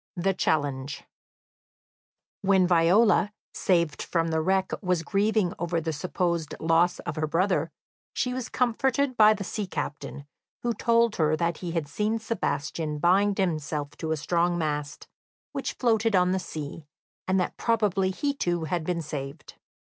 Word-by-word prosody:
The 190 Hz, +2 st, +1 dB
Challenge 140 Hz, -5 st, -1 dB, 1.4 s
When 190 Hz, -1 st, +4 dB
Viola, 185 Hz, +5 st, +4 dB, 0.2 s
saved 170 Hz, -5 st, +1 dB
from 165 Hz, -1 st, 0 dB
the 160 Hz, 0 st, +1 dB
wreck, 190 Hz, +3 st, +1 dB
was 180 Hz, -4 st, 0 dB
grieving 205 Hz, -1 st, +1 dB
over 170 Hz, -1 st, 0 dB
the 160 Hz, 0 st, -3 dB
supposed 170 Hz, -1 st, -2 dB
loss 165 Hz, +2 st, +3 dB
of -, -, -5 dB
her 155 Hz, 0 st, 0 dB
brother, 180 Hz, +5 st, +1 dB, 0.5 s
she 250 Hz, -, 0 dB
was 255 Hz, -1 st, -4 dB
comforted 255 Hz, +2 st, +1 dB
by 215 Hz, -1 st, +6 dB
the 205 Hz, -, -5 dB
sea 205 Hz, +1 st, -4 dB
captain, 145 Hz, -4 st, -5 dB, 0.4 s
who 240 Hz, -1 st, +1 dB
told 230 Hz, 0 st, +2 dB
her 155 Hz, -1 st, +3 dB
that 170 Hz, 0 st, 0 dB
he 175 Hz, -2 st, -4 dB
had 165 Hz, -4 st, -1 dB
seen 210 Hz, +8 st, -1 dB
Sebastian 155 Hz, -8 st, -2 dB
bind 195 Hz, +6 st, +3 dB
himself 150 Hz, -5 st, -2 dB
to 160 Hz, -, -3 dB
a 160 Hz, -, +1 dB
strong 175 Hz, +3 st, +1 dB
mast, 150 Hz, -2 st, -3 dB, 0.4 s
which -, -, -3 dB
floated 225 Hz, -3 st, +2 dB
on 180 Hz, 0 st, +4 dB
the 190 Hz, -, +1 dB
sea, 155 Hz, -3 st, -7 dB, 0.4 s
and 190 Hz, 0 st, +2 dB
that 180 Hz, -, -1 dB
probably 210 Hz, -5 st, +1 dB
he 285 Hz, +9 st, -1 dB
too 175 Hz, -10 st, -1 dB
had 170 Hz, +1 st, -1 dB
been 170 Hz, 0 st, -2 dB
saved. 145 Hz, 0 st, -6 dB
175 Hz, 155 wpm, -27 LUFS, 160-205 Hz, 1.4 s, by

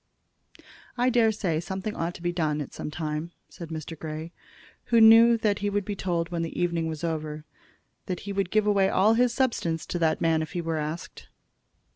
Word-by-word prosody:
"I 250 Hz, +1 st, +2 dB
dare 230 Hz, -2 st, +4 dB
say 180 Hz, -7 st, -1 dB
something 190 Hz, +5 st, -4 dB
ought 170 Hz, +1 st, -3 dB
to 170 Hz, -, -11 dB
be 175 Hz, -, 0 dB
done 155 Hz, -4 st, -1 dB
at 145 Hz, -, -6 dB
some -, -, -5 dB
time," 155 Hz, +1 st, -4 dB, 0.2 s
said 170 Hz, -2 st, -9 dB
Mr. 160 Hz, 0 st, -6 dB
Grey, 155 Hz, +1 st, -6 dB, 0.5 s
who 235 Hz, -, +3 dB
knew 225 Hz, +1 st, +8 dB
that 210 Hz, -3 st, 0 dB
he 205 Hz, -, -1 dB
would 205 Hz, -1 st, -1 dB
be 205 Hz, -, -3 dB
told, 170 Hz, -3 st, -2 dB
when 170 Hz, -1 st, -2 dB
the 165 Hz, -, -4 dB
evening 170 Hz, -2 st, 0 dB
was 160 Hz, -1 st, -5 dB
over, 155 Hz, -2 st, -3 dB, 0.6 s
that 180 Hz, -2 st, -3 dB
he 200 Hz, 0 st, -5 dB
would 195 Hz, -2 st, -1 dB
give 215 Hz, +1 st, +2 dB
away 200 Hz, -2 st, +3 dB
all 205 Hz, +4 st, +4 dB
his 245 Hz, +1 st, +3 dB
substance 230 Hz, -11 st, -1 dB
to 175 Hz, -, -3 dB
that 160 Hz, -1 st, +1 dB
man 165 Hz, -1 st, +2 dB
if 155 Hz, -, -6 dB
he 175 Hz, -, -2 dB
were 165 Hz, -1 st, -2 dB
asked. 155 Hz, +3 st, -6 dB
175 Hz, 205 wpm, -26 LUFS, 160-205 Hz, 0.6 s, knew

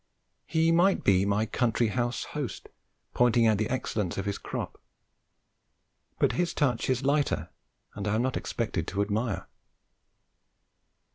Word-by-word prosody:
He 160 Hz, +1 st, +2 dB
might 180 Hz, +4 st, +3 dB
be 95 Hz, 0 st, +4 dB
my 105 Hz, +2 st, +2 dB
country 115 Hz, -1 st, +1 dB
house 120 Hz, +2 st, -1 dB
host 145 Hz, -5 st, -5 dB, 0.4 s
pointing 120 Hz, -1 st, +4 dB
out 110 Hz, -2 st, +3 dB
the 110 Hz, -, 0 dB
excellence 110 Hz, -7 st, -2 dB
of 95 Hz, -, -2 dB
his 100 Hz, 0 st, -2 dB
crop, -, -, -5 dB, 1.4 s
but -, -, +3 dB
his 175 Hz, 0 st, -1 dB
touch 130 Hz, -6 st, +1 dB
is 130 Hz, 0 st, +1 dB
lighter 145 Hz, +1 st, +1 dB, 0.4 s
and 105 Hz, 0 st, -4 dB
I 105 Hz, -, +1 dB
am 115 Hz, -, +1 dB
not 130 Hz, 0 st, -1 dB
expected 100 Hz, -8 st, -2 dB
to 100 Hz, +1 st, 0 dB
admire. 105 Hz, +1 st, -2 dB
115 Hz, 140 wpm, -28 LUFS, 105-130 Hz, 1.4 s, be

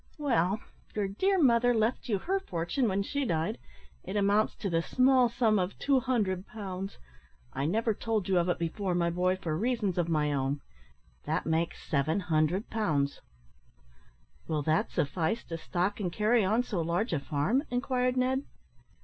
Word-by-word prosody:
"Well, 220 Hz, -, +1 dB, 0.4 s
your 205 Hz, -2 st, 0 dB
dear 380 Hz, -, +1 dB
mother 245 Hz, -4 st, +4 dB
left 225 Hz, +3 st, 0 dB
you 205 Hz, -, +2 dB
her 380 Hz, -, -1 dB
fortune 180 Hz, -, -1 dB
when 200 Hz, 0 st, 0 dB
she 285 Hz, +7 st, -2 dB
died 165 Hz, -8 st, -1 dB, 0.4 s
it -, -, -6 dB
amounts 205 Hz, +1 st, +2 dB
to 205 Hz, -, -4 dB
the 165 Hz, -3 st, +1 dB
small 255 Hz, +4 st, +4 dB
sum 225 Hz, -3 st, +2 dB
of 185 Hz, +1 st, -2 dB
200 240 Hz, -9 st, +1 dB
pounds. 195 Hz, -2 st, -6 dB, 0.6 s
I 140 Hz, -, -1 dB
never 225 Hz, +5 st, +1 dB
told 215 Hz, -2 st, -2 dB
you 185 Hz, -2 st, +3 dB
of 175 Hz, +1 st, 0 dB
it 175 Hz, -, +1 dB
before, 175 Hz, +2 st, -2 dB
my 170 Hz, -1 st, +1 dB
boy, 180 Hz, +2 st, +1 dB
for 170 Hz, -4 st, -3 dB
reasons 210 Hz, -2 st, 0 dB
of 170 Hz, -1 st, 0 dB
my 150 Hz, -2 st, +1 dB
own. 135 Hz, +1 st, -1 dB, 0.6 s
That -, -, -1 dB
makes 160 Hz, +1 st, -1 dB
700 160 Hz, -, +1 dB
pounds." 150 Hz, -11 st, 0 dB, 1.3 s
"Will 155 Hz, -2 st, -1 dB
that 155 Hz, +2 st, +1 dB
suffice 165 Hz, +9 st, -1 dB
to 165 Hz, -, -6 dB
stock 185 Hz, +5 st, -1 dB
and 180 Hz, -4 st, -2 dB
carry 215 Hz, +4 st, +3 dB
on 220 Hz, +6 st, +2 dB
so 200 Hz, -8 st, -2 dB
large 170 Hz, +6 st, -1 dB
a 150 Hz, -, +1 dB
farm," 155 Hz, -, 0 dB
inquired 250 Hz, 0 st, 0 dB
Ned? 260 Hz, +1 st, +2 dB
195 Hz, 165 wpm, -30 LUFS, 170-235 Hz, 1.3 s, mother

